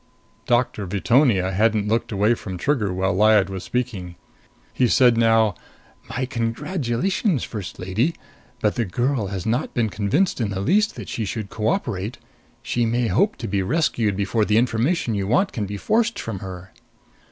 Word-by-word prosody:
Doctor 120 Hz, -4 st, +1 dB
Veetonia 100 Hz, 0 st, +2 dB
hadn't 105 Hz, +1 st, +2 dB
looked 115 Hz, +2 st, 0 dB
away 105 Hz, +3 st, +3 dB
from 95 Hz, -5 st, -6 dB
Trigger 110 Hz, -2 st, 0 dB
while 95 Hz, +1 st, 0 dB
Lyad 105 Hz, -1 st, +4 dB
was 95 Hz, -1 st, -5 dB
speaking. 110 Hz, -8 st, -3 dB, 0.6 s
He 125 Hz, -, +2 dB
said 120 Hz, 0 st, +5 dB
now, 115 Hz, -2 st, +3 dB, 0.6 s
"My 130 Hz, +2 st, -2 dB
congratulations, 130 Hz, -, -1 dB
First 105 Hz, -6 st, -6 dB
Lady! 110 Hz, -, -1 dB, 0.5 s
But 105 Hz, -, +2 dB
the 120 Hz, -, -1 dB
girl 120 Hz, +3 st, -1 dB
has 95 Hz, -2 st, -5 dB
not 115 Hz, +3 st, -1 dB
been 115 Hz, -3 st, +1 dB
convinced 125 Hz, -, 0 dB
in 110 Hz, -, 0 dB
the 95 Hz, -1 st, -3 dB
least 205 Hz, -, +2 dB
that -, -, -8 dB
she 115 Hz, -, -3 dB
should 105 Hz, 0 st, -4 dB
cooperate. 110 Hz, -, -2 dB, 0.5 s
She 120 Hz, 0 st, 0 dB
may 115 Hz, 0 st, +1 dB
hope 205 Hz, +2 st, +2 dB
to -, -, -6 dB
be 100 Hz, 0 st, 0 dB
rescued 115 Hz, -, 0 dB
before 100 Hz, +2 st, +1 dB
the 105 Hz, +1 st, +2 dB
information 120 Hz, +4 st, +1 dB
you 100 Hz, -2 st, -1 dB
want 160 Hz, -, +2 dB
can 105 Hz, -3 st, -3 dB
be 100 Hz, +1 st, -5 dB
forced 230 Hz, -, +1 dB
from 110 Hz, -4 st, -5 dB
her." 95 Hz, -1 st, -8 dB
110 Hz, 165 wpm, -22 LUFS, 100-125 Hz, 0.6 s, said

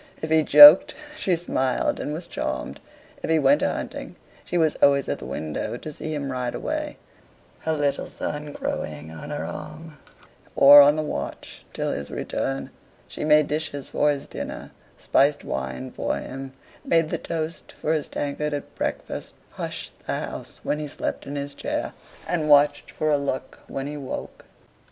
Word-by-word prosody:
If 160 Hz, -, -5 dB
he 160 Hz, 0 st, +5 dB
joked, 150 Hz, +3 st, +9 dB, 0.2 s
she 190 Hz, -, +1 dB
smiled 135 Hz, -6 st, 0 dB
and 145 Hz, -, -3 dB
was 165 Hz, +3 st, -5 dB
charmed. 65 Hz, -, -4 dB, 0.4 s
If -, -, -4 dB
he 160 Hz, -, +4 dB
went 140 Hz, -1 st, +4 dB
a -, -, +2 dB
hunting, -, -, -6 dB, 0.3 s
she 175 Hz, -, -2 dB
was 160 Hz, -3 st, +2 dB
always 140 Hz, -1 st, +4 dB
at -, -, -2 dB
the -, -, -8 dB
window 75 Hz, +3 st, -4 dB
to 155 Hz, -, -7 dB
see 155 Hz, +1 st, -6 dB
him 140 Hz, -2 st, -3 dB
ride 125 Hz, -1 st, -3 dB
away, -, -, -3 dB, 0.6 s
her 160 Hz, -, -1 dB
little 145 Hz, -2 st, 0 dB
son 150 Hz, 0 st, -5 dB
crowing 75 Hz, +1 st, -4 dB
on 115 Hz, -, -8 dB
her 145 Hz, 0 st, -3 dB
arm, 155 Hz, -1 st, -8 dB, 0.6 s
or 145 Hz, +1 st, +10 dB
on 145 Hz, +1 st, +6 dB
the 155 Hz, -, -1 dB
watch 70 Hz, -, -6 dB
till -, -, -2 dB
his 70 Hz, 0 st, -4 dB
return. 70 Hz, +1 st, -3 dB, 0.4 s
She -, -, -6 dB
made 150 Hz, 0 st, +5 dB
dishes 145 Hz, -2 st, -3 dB
for 150 Hz, -, +2 dB
his 140 Hz, -1 st, -1 dB
dinner: -, -, -7 dB, 0.3 s
spiced 145 Hz, +1 st, +2 dB
wine 65 Hz, 0 st, -4 dB
for -, -, -2 dB
him: 135 Hz, 0 st, -7 dB, 0.3 s
made 165 Hz, -2 st, +2 dB
the -, -, -1 dB
toast 165 Hz, 0 st, -5 dB
for 155 Hz, -, 0 dB
his 155 Hz, -3 st, -1 dB
tankard 145 Hz, +1 st, -2 dB
at 145 Hz, -, -7 dB
breakfast: -, -, -4 dB, 0.2 s
hushed -, -, -7 dB
the -, -, -1 dB
house -, -, -6 dB
when 150 Hz, -, -1 dB
he 150 Hz, -, -4 dB
slept 145 Hz, -, -4 dB
in 140 Hz, -, -5 dB
his 140 Hz, 0 st, -4 dB
chair, -, -, -3 dB, 0.3 s
and 160 Hz, -4 st, -1 dB
watched 145 Hz, 0 st, +5 dB
for 155 Hz, 0 st, -1 dB
a 145 Hz, -, +4 dB
look 140 Hz, -2 st, -4 dB
when 135 Hz, -, -4 dB
he 150 Hz, +1 st, -5 dB
woke. 135 Hz, -3 st, -7 dB
145 Hz, 175 wpm, -24 LUFS, 135-155 Hz, 0.6 s, or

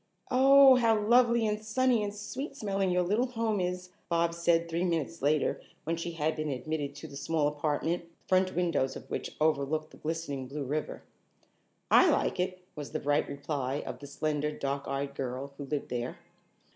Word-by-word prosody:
"Oh, 270 Hz, 0 st, +8 dB
how 225 Hz, -3 st, +3 dB
lovely 235 Hz, +1 st, +4 dB
and 210 Hz, 0 st, -1 dB
sunny 245 Hz, +2 st, +2 dB
and 205 Hz, -, -2 dB
sweet 210 Hz, +8 st, -6 dB
smelling 195 Hz, -5 st, 0 dB
your 180 Hz, 0 st, +2 dB
little 210 Hz, +8 st, +1 dB
home 225 Hz, -4 st, -1 dB
is," 180 Hz, 0 st, -3 dB, 0.2 s
Bobs 170 Hz, 0 st, +1 dB
said 170 Hz, 0 st, +3 dB
three 170 Hz, +1 st, -1 dB
minutes 165 Hz, -2 st, -1 dB
later 145 Hz, +2 st, +1 dB, 0.2 s
when 165 Hz, +1 st, -1 dB
she 170 Hz, +1 st, -4 dB
had 160 Hz, -1 st, 0 dB
been 155 Hz, -1 st, -3 dB
admitted 140 Hz, +2 st, -3 dB
to 145 Hz, +2 st, -8 dB
the 140 Hz, -, -11 dB
small 150 Hz, +1 st, 0 dB
apartment, 150 Hz, +3 st, -1 dB
the 170 Hz, 0 st, -30 dB
front 185 Hz, -1 st, +2 dB
windows 165 Hz, -7 st, +1 dB
of -, -, -9 dB
which -, -, -4 dB
overlooked 155 Hz, 0 st, +1 dB
the -, -, -14 dB
glistening 155 Hz, -4 st, -4 dB
blue 145 Hz, +2 st, -4 dB
river. 150 Hz, +3 st, -3 dB, 0.9 s
"I -, -, +7 dB
like -, -, +1 dB
it," 185 Hz, 0 st, -2 dB
was 145 Hz, -2 st, -7 dB
the -, -, -1 dB
bright 145 Hz, +1 st, +1 dB
reply 140 Hz, -1 st, -3 dB
of 125 Hz, -1 st, -6 dB
the 140 Hz, -, -9 dB
slender 150 Hz, +1 st, -1 dB
dark 140 Hz, -1 st, -3 dB
eyed 140 Hz, 0 st, -2 dB
girl 135 Hz, +1 st, -4 dB
who 145 Hz, -, -6 dB
lived 145 Hz, +1 st, -3 dB
there. 120 Hz, 0 st, -3 dB
165 Hz, 185 wpm, -30 LUFS, 145-190 Hz, 0.9 s, Oh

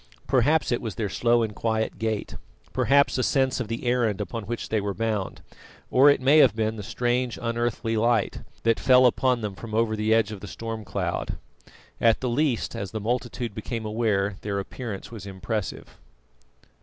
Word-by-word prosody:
Perhaps 140 Hz, +4 st, +2 dB
it 120 Hz, -, 0 dB
was 110 Hz, -6 st, -5 dB
their 105 Hz, -1 st, -2 dB
slow 120 Hz, +4 st, +2 dB
and 110 Hz, -1 st, -3 dB
quiet 110 Hz, -1 st, -1 dB
gait, 110 Hz, -2 st, -2 dB, 0.4 s
perhaps 140 Hz, -1 st, +3 dB
a -, -, +3 dB
sense 130 Hz, 0 st, +1 dB
of 125 Hz, -, -3 dB
the 115 Hz, +3 st, -4 dB
errand 120 Hz, -5 st, +1 dB
upon 115 Hz, -3 st, -4 dB
which 120 Hz, +1 st, -4 dB
they 110 Hz, -1 st, +1 dB
were 100 Hz, -1 st, -3 dB
bound; 110 Hz, -3 st, -2 dB, 0.5 s
or 135 Hz, +3 st, +7 dB
it 145 Hz, -, +4 dB
may 140 Hz, +4 st, +5 dB
have 125 Hz, -8 st, +6 dB
been 110 Hz, 0 st, 0 dB
the 105 Hz, -, -6 dB
strange 120 Hz, +3 st, -1 dB
unearthly 115 Hz, -1 st, -1 dB
light 115 Hz, -1 st, +1 dB, 0.2 s
that 115 Hz, -1 st, +2 dB
fell 130 Hz, -1 st, +6 dB
upon 125 Hz, 0 st, +2 dB
them 105 Hz, -2 st, -3 dB
from 110 Hz, +2 st, -7 dB
over 110 Hz, -1 st, +2 dB
the 110 Hz, +1 st, 0 dB
edge 110 Hz, 0 st, +3 dB
of 105 Hz, -, -6 dB
the 100 Hz, -, -9 dB
storm 115 Hz, +1 st, -6 dB
cloud; -, -, -3 dB, 0.6 s
at 115 Hz, -1 st, +4 dB
the 130 Hz, -, -2 dB
least, 135 Hz, -1 st, 0 dB
as 100 Hz, -, -4 dB
the 110 Hz, -, -4 dB
multitude 120 Hz, +1 st, -2 dB
became 110 Hz, +1 st, -5 dB
aware, 105 Hz, -3 st, 0 dB
their 100 Hz, -1 st, -2 dB
appearance 100 Hz, +1 st, -6 dB
was 110 Hz, -3 st, -8 dB
impressive. 100 Hz, +1 st, -5 dB
115 Hz, 185 wpm, -25 LUFS, 110-120 Hz, 0.6 s, or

